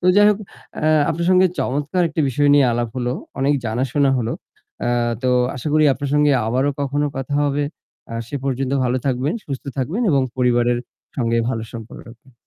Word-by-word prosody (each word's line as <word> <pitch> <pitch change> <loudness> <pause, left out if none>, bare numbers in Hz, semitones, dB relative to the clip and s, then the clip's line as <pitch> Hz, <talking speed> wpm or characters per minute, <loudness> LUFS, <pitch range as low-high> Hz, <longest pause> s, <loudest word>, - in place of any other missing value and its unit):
তো 180 - -1
যাই 205 0 +7
হোক 205 - 0 0.4
অ্যা 155 - +2 0.2
আপনার 170 +2 -2
সঙ্গে 185 0 +6
চমৎকার 145 +7 0
একটি 160 +1 -2
বিষয় 145 +3 +2
নিয়ে 140 -2 +5
আলাপ 120 0 -1
হলো, 125 -1 -1 0.3
অনেক 140 +2 +3
জানাশোনা 130 +5 +1
হলো। 115 -1 -1 0.5
আ - - +1 0.3
তো 130 - +2 0.3
আশা 130 - -4
করি 155 0 +4
আপনার 140 0 -4
সঙ্গে 150 0 +4
আবারো 130 +5 +1
কখনো 145 +1 0
কথা 135 +1 -3
হবে। 145 0 0 0.5
আ - - -4
সে 145 - -4
পর্যন্ত 135 0 -1
ভালো 125 0 +1
থাকবেন, 135 +4 0
সুস্থ 135 -3 -6
থাকবেন 155 - -1
এবং 140 -3 +3
পরিবারের 120 -1 +2 0.4
সঙ্গে 115 -2 +1
ভালো 115 -3 -2
সম্পর্ক 115 -1 -9
রাখবেন। 120 +3 -17
135 Hz, 185 wpm, -20 LUFS, 125-145 Hz, 0.5 s, যাই